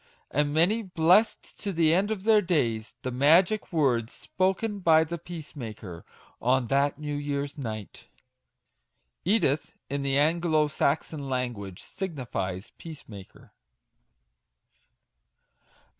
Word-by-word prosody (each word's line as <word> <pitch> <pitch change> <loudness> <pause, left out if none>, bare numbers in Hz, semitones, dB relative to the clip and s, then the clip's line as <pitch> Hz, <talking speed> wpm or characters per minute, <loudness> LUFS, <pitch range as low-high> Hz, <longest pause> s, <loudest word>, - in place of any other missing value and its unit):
And 145 +1 +1
many 175 +9 +3
blessed 185 +2 +2
to 200 - -2
the 165 -3 +3
end 195 +4 +2
of 210 -3 -3
their 215 -1 +5
days 115 - -1
the 130 - -2
Magic 165 - +3
Words 125 -8 +1
spoken 195 +3 -1
by 160 -3 +5
the 170 +2 -5
Peacemaker* 120 - -8 0.4
on 125 +1 +2
that 140 +1 +2
New 150 0 -4
year's 145 0 -3
Night. 110 -8 -7 0.6
* - - -50
Edith, 150 -10 0
in 140 0 -1
the 135 0 +1
Anglo 160 +1 +3
Saxon 145 0 -1
language, 120 -8 -4
signifies 120 - -5
Peace 160 -3 -10
maker. 100 -3 -13
145 Hz, 115 wpm, -27 LUFS, 125-170 Hz, 0.6 s, their